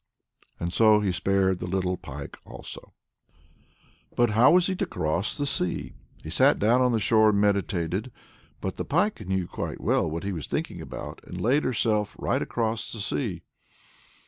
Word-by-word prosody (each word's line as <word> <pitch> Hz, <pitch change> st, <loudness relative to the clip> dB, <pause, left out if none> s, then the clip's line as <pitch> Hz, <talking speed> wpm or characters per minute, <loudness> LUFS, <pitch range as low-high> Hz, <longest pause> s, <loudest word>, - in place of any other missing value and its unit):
And 85 Hz, +1 st, -3 dB
so 110 Hz, 0 st, +5 dB
he 100 Hz, -3 st, +1 dB
spared 95 Hz, 0 st, +1 dB
the 90 Hz, -, -4 dB
little 90 Hz, 0 st, 0 dB
pike 70 Hz, -4 st, -8 dB
also. -, -, -10 dB, 1.2 s
But 120 Hz, -2 st, +3 dB
how 115 Hz, +6 st, +6 dB
was 180 Hz, -1 st, +5 dB
he 190 Hz, -, -1 dB
to -, -, -1 dB
cross 85 Hz, -, -1 dB
the 145 Hz, -, -1 dB
sea? 90 Hz, -10 st, -1 dB, 0.3 s
He -, -, -7 dB
sat -, -, +4 dB
down 120 Hz, +5 st, +3 dB
on 125 Hz, -1 st, +3 dB
the 115 Hz, -, +1 dB
shore 110 Hz, 0 st, +4 dB
and 100 Hz, -1 st, +2 dB
meditated. 100 Hz, +1 st, 0 dB, 0.5 s
But 95 Hz, -, -4 dB
the -, -, -2 dB
pike 175 Hz, -, 0 dB
knew 95 Hz, -1 st, 0 dB
quite -, -, -5 dB
well 80 Hz, -, +1 dB
what 85 Hz, +2 st, -4 dB
he 100 Hz, -, -2 dB
was 85 Hz, -5 st, -5 dB
thinking -, -, -3 dB
about, -, -, -8 dB
and -, -, -7 dB
laid 135 Hz, +6 st, +2 dB
herself 105 Hz, -4 st, 0 dB
right -, -, 0 dB
across 115 Hz, -1 st, -2 dB
the 110 Hz, -, -6 dB
sea. 100 Hz, -4 st, -2 dB
105 Hz, 175 wpm, -26 LUFS, 90-115 Hz, 1.2 s, how